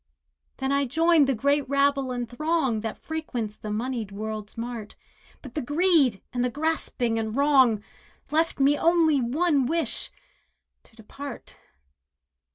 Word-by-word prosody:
Then 265 0 -1
I 280 0 +2
joined 320 +2 +4
the 270 - +1
great 280 +3 +1
rabble 280 -1 +2
and 245 -1 -3
throng 270 -3 0
That 225 -1 -4
frequents 250 -10 -4
the 215 - -8
moneyed 225 -1 -3
world's 215 +1 -6
mart; 230 -2 -6 0.5
But 265 -4 -10
the 305 - -2
greed, 290 - +3
and 245 0 0
the 250 - +1
grasping 255 -5 -1
and 220 0 -3
wrong, 265 -7 +4 0.5
Left 320 0 +1
me 280 +2 +3
only 325 -4 +3
one 280 +2 +1
wish—to 310 -6 -6
depart. 245 +5 -9
265 Hz, 135 wpm, -26 LUFS, 230-300 Hz, 0.5 s, joined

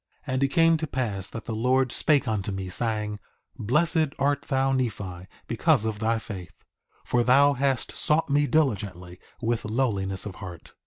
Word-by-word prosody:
2:19 130 - -2
And 130 +1 +1
it - - +4
came 165 +3 +4
to 160 0 -3
pass 110 -9 -2
that 115 - -8
the 115 - -4
Lord 125 +3 +2
spake 145 -3 +2
unto 105 -2 -1
me, 95 -1 -4
saying: 105 0 -1 0.4
Blessed 155 - +1
art 140 0 +1
thou, 135 0 +1
Nephi, 100 -8 -3 0.2
because 120 0 +2
of 110 -2 -2
thy 115 +1 +1
faith, 95 -6 -9 0.4
for 120 -1 +2
thou 140 +3 +5
hast 135 -1 0
sought 155 +2 +1
me 145 +1 +2
diligently, 100 - -1 0.2
with 115 0 0
lowliness 105 -5 -1
of 100 -3 -7
heart. 90 -4 -10
120 Hz, 170 wpm, -26 LUFS, 100-140 Hz, 0.4 s, thou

